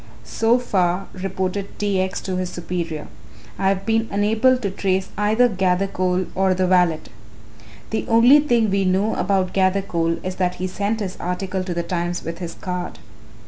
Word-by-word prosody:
"So 225 +2 +2
far," 190 -6 0
reported 190 +1 -3
T. 200 -2 0
X. 185 0 -2
to 185 - -3
his 185 -1 -2
superior, 170 -3 -4 0.5
"I 190 - +2
have 195 0 -1
been 225 0 +1
unable 220 +5 +3
to 205 -6 -3
trace 190 -1 -1
either 215 +4 +3
Gathercole 185 -2 0
or 190 0 +2
the 185 0 +1
valet. 180 -3 +3 0.9
The 220 - -2
only 240 +5 +7
thing 240 -7 +2
we 195 0 +2
know 190 +4 +1
about 190 -1 0
Gathercole 185 -3 +1
is 185 0 -4
that 180 -1 0
he 185 - -4
sent 205 +4 -2
his 190 -2 -4
article 185 +1 -3
to 180 -2 -4
The 170 - -1
Times 175 0 -2
with 165 +1 -6
his 170 -2 -6
card. 180 -1 -5
190 Hz, 170 wpm, -21 LUFS, 180-205 Hz, 0.9 s, only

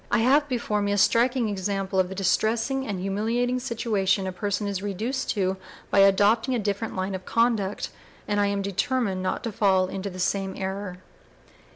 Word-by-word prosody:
I - - +2
have 280 +6 +3
before 235 -4 -1
me 200 0 0
a 205 - +1
striking 240 +3 +3
example 195 -1 -2
of 185 -1 +2
the 190 - -6
distressing 225 +7 0
and 200 -3 -3
humiliating 225 +6 0
situation 215 -6 0
a 185 - -2
person 200 +2 -2
is 200 -2 -2
reduced 220 +7 -3
to 190 -1 0 0.3
by - - +4
adopting 205 +6 +4
a - - +1
different 205 0 -2
line 190 +1 -2
of 190 -1 -5
conduct, 220 -3 0 0.4
and 205 0 0
I 205 - +3
am 200 0 -1
determined 200 0 -1
not 185 0 -2
to 230 - -3
fall 190 -2 +3
into 195 +1 -4
the 185 - -9
same 190 +1 -1
error." 190 -1 -4
200 Hz, 185 wpm, -25 LUFS, 190-230 Hz, 0.4 s, by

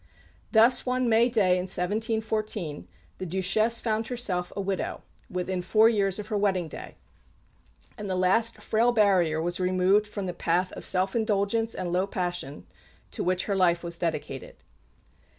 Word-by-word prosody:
Thus, 230 +2 +5
one 255 0 0
May 230 +2 +4
day 195 -6 +3
in 180 - -2
1714, 215 - -2 0.3
the 185 - -4
Duchesse 195 +6 +1
found 220 -1 -1
herself 200 -8 -3
a - - -4
widow, 195 -1 -3 0.3
within 180 0 -2
four 220 +5 +5
years 195 -4 +1
of 210 - -5
her 210 - 0
wedding 190 -4 +1
day; - - -9 1.0
and 205 -1 -5
the 185 - 0
last 205 +6 +1
frail 230 +2 +2
barrier 190 -8 +3
was 175 +3 -2
removed 185 +3 +2
from 205 -2 -5
the 180 - -3
path 175 +2 0
of - - -7
self 190 +2 0
indulgence 220 0 0
and 180 -2 -3
low 185 +2 +1
passions 175 -7 -4 0.5
to - - -3
which 180 +1 0
her 200 - -1
life 175 -2 +2
was 170 -1 -5
dedicated. 150 -6 -4
195 Hz, 160 wpm, -27 LUFS, 180-220 Hz, 1.0 s, Thus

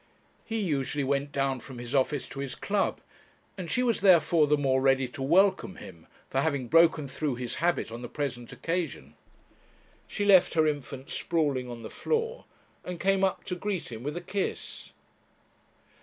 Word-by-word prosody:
He 225 0 -3
usually 145 -6 -1
went 140 +1 0
down 135 -2 0
from 130 0 -10
his 120 +2 -7
office 140 +1 +1
to 135 - -8
his 140 -2 -4
club, 205 0 -1 0.5
and 180 -4 -6
she 250 - +1
was 235 -5 +1
therefore 170 -4 +5
the 150 +1 +3
more 135 -2 +2
ready 135 -1 +3
to 135 - -8
welcome 185 +6 +3
him 85 - -12 0.2
for 135 - 0
having 140 -5 -1
broken 165 -3 +5
through 140 0 -2
his 125 -1 -5
habit 170 -8 +1
on 115 +1 -7
the 120 - -6
present 125 -5 -4
occasion. 165 - -3 0.9
She 205 - -2
left 190 -4 +6
her 160 -1 +4
infant 140 -3 -3
sprawling 145 -7 0
on 120 -1 -8
the 110 - -7
floor, 460 +1 -2 0.4
and 180 -2 -6
came 195 +1 +2
up 190 - +1
to 180 - -4
greet 185 -5 -3
him 110 -1 -7
with 145 +5 -4
a - - -4
kiss. 195 +2 -4
145 Hz, 175 wpm, -28 LUFS, 130-180 Hz, 0.9 s, left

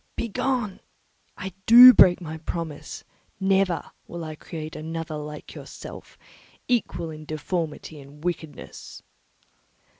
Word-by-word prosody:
"Begone! 235 -2 -2 0.6
I 190 0 -6
do 245 +2 +11
break 180 -6 +6
my 160 -1 -7
promise; 160 -2 -6 0.4
never 190 -2 +1 0.2
will 170 -1 -7
I 155 -1 -6
create 155 0 -8
another 160 0 -5
like 150 0 -8
yourself, - - -11 0.5
equal 215 -9 -1
in 155 0 -9
deformity 155 0 -4
and 145 +2 -15
wickedness." 165 -3 -6
165 Hz, 110 wpm, -25 LUFS, 155-190 Hz, 0.6 s, do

